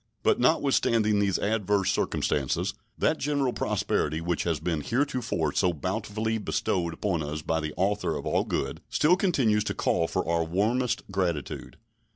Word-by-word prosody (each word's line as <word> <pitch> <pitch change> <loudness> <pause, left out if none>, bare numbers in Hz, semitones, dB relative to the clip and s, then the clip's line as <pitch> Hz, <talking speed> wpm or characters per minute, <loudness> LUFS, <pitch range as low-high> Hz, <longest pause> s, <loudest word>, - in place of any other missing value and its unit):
But - - +3
notwithstanding 115 -6 +3
these 100 -2 +2
adverse 105 -2 +1
circumstances, 70 -3 0 0.2
that - - +1
general 140 -3 0
prosperity 75 +2 0
which 85 0 -1
has 85 -4 0
been 80 -1 -1
heretofore 120 - -1
so 90 -2 +2
bountifully 110 +6 -2
bestowed 85 -4 -1
upon 90 -4 -1
us 75 +1 -4
by 80 +1 0
the 75 -1 -4
Author 100 +3 0
of - - -5
All - - +1
Good - - -3
still 160 +4 +4
continues 130 - +2
to - - -2
call 85 - +1
for - - -2
our 85 0 +2
warmest 110 +9 0
gratitude. 90 -6 -2
100 Hz, 155 wpm, -27 LUFS, 80-115 Hz, 0.2 s, still